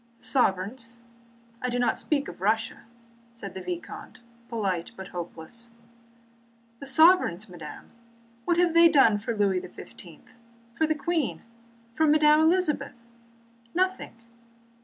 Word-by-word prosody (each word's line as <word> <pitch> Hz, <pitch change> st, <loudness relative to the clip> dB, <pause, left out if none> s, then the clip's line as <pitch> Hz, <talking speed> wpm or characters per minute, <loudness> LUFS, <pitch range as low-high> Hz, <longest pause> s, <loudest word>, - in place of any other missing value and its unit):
"The -, -, -19 dB
sovereigns? 230 Hz, 0 st, 0 dB, 0.6 s
I 250 Hz, -, -1 dB
do 245 Hz, -, -1 dB
not 245 Hz, 0 st, +2 dB
speak 285 Hz, -2 st, 0 dB
of -, -, -10 dB
Russia," 220 Hz, +3 st, 0 dB, 0.5 s
said 200 Hz, -5 st, -7 dB
the 190 Hz, -, -7 dB
vicomte, 350 Hz, -7 st, -7 dB, 0.3 s
polite 195 Hz, -7 st, -2 dB
but 190 Hz, -2 st, -9 dB
hopeless: 175 Hz, +6 st, -8 dB, 1.1 s
"The 280 Hz, -, -7 dB
sovereigns, 290 Hz, -, +4 dB
madame... 170 Hz, -5 st, -10 dB, 0.5 s
What 345 Hz, -, +2 dB
have 350 Hz, -1 st, +3 dB
they 335 Hz, 0 st, +7 dB
done 230 Hz, -9 st, +5 dB
for 225 Hz, +1 st, -4 dB
Louis 195 Hz, -3 st, +2 dB
XVII, -, -, -12 dB, 0.5 s
for 315 Hz, +6 st, +1 dB
the 310 Hz, -, +1 dB
Queen, 315 Hz, -1 st, -1 dB
or -, -, -26 dB, 0.5 s
for 315 Hz, +5 st, +2 dB
Madame 300 Hz, 0 st, +5 dB
Elizabeth? 325 Hz, -2 st, +2 dB, 0.8 s
Nothing!" 370 Hz, -7 st, -1 dB
245 Hz, 130 wpm, -27 LUFS, 200-315 Hz, 1.1 s, they